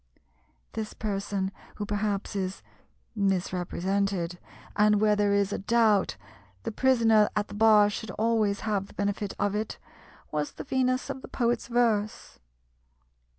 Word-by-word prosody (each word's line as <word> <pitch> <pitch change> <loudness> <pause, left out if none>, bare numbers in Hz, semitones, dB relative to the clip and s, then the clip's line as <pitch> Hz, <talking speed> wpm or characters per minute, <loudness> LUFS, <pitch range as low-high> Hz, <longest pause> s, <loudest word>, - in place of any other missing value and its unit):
This 220 -1 -5
person, 200 -2 -2 0.2
who 210 - -4
perhaps 205 -1 -2
is 190 -1 -3 0.5
misrepresented 185 -1 -1 0.4
and 210 0 +4
where 210 0 +4
there 205 -1 +2
is 200 0 +2
a - - -2
doubt 215 - +2 0.5
the - - -3
prisoner 225 -3 +4
at 210 -1 -1
the - - -9
bar 210 -1 +6
should 210 +1 -5
always 215 -2 +1
have 205 -3 -1
the - - -17
benefit 200 0 -2
of 205 -1 0
it 215 +1 -3 0.5
was 150 -1 -2
the - - -7
Venus 255 +1 0
of 265 -1 -7
the - - -9
poet's 240 -2 0
verse. 230 -3 0
210 Hz, 140 wpm, -28 LUFS, 200-220 Hz, 0.5 s, bar